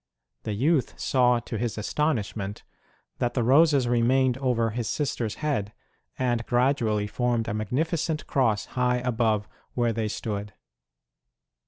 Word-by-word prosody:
The 105 - -3
youth 135 +6 +1
saw 125 -2 +3
to 115 -2 -5
his 120 -2 -2
astonishment 105 -5 -2 0.6
that 120 -1 -1
the 120 - +1
roses 140 +1 +4
remained 125 +2 +3
over 120 -4 +1
his 115 0 -3
sister 130 0 -1
s 105 - -4
head, 130 -10 -2 0.4
and 120 -2 0
gradually 120 -4 +1
formed 120 +1 -1
a 110 - -2
magnificent 155 - -1
cross 115 -6 +1
high 125 -1 +2
above 115 -4 0 0.3
where 120 -2 +1
they 110 -1 -1
stood. 105 -1 -4
120 Hz, 135 wpm, -26 LUFS, 110-130 Hz, 0.6 s, roses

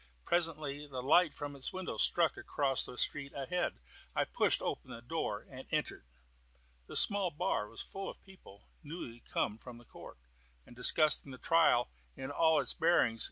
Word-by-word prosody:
Presently 155 -4 -1
the 130 -3 -5
light 160 +4 +5
from 145 -1 -6
its 135 - -2
windows 185 -1 -3
struck 170 -2 +4
across 140 -3 0
the 125 - -9
street, 140 +1 -1
ahead. 175 +6 -1 0.4
I - - +2
pushed - - +2
open - - -3
the 115 - -9
door 120 -6 -3
and 130 -1 -10
entered. 150 - -2 0.8
The - - -9
small 200 -3 +4
bar 150 - -1
was 115 - -6
full 195 0 -6
of - - -10
people 185 - -16 0.2
newly 145 -7 -8
come 110 -2 -2
from 125 0 -10
the 120 - -15
court, - - -12 0.5
and - - -15
discussing 145 +3 +3
the 130 - -8
trial 165 - +3 0.3
in 135 +1 -5
all 160 +1 +4
its 135 - 0
bearings. 160 -9 +3
145 Hz, 170 wpm, -33 LUFS, 125-165 Hz, 0.8 s, light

